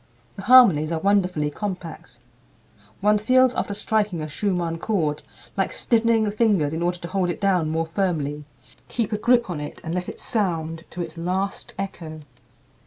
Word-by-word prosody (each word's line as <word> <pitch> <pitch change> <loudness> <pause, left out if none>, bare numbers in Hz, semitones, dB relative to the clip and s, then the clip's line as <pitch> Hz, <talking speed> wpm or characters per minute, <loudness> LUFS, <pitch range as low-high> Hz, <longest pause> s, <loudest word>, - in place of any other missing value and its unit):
The - - -7
harmonies 195 -10 +6
are 165 - -1
wonderfully 180 -5 +1
compact. 175 - -6 0.8
One 210 +1 +3
feels 255 +3 +4
after 205 - -2
striking 210 -4 0
a - - -4
Schumann 170 0 -2
chord 160 -9 -1 0.3
like - - 0
stiffening 230 -1 +2
the 210 - 0
fingers 205 -9 +2
in 160 - -3
order 175 +1 0
to 170 - -7
hold 180 +1 0
it 175 - -3
down 185 -6 +2
more 160 +1 0
firmly, 160 -5 -2 0.4
keep 230 -2 -2
a - - +1
grip 240 +1 +3
on 170 -5 -4
it, 150 - -7
and 165 - -4
let 180 0 -3
it - - -9
sound 165 -6 -2
to 180 - -6
its 165 -1 -6
last 190 +3 -3
echo. 165 -5 -6
180 Hz, 175 wpm, -23 LUFS, 160-210 Hz, 0.8 s, harmonies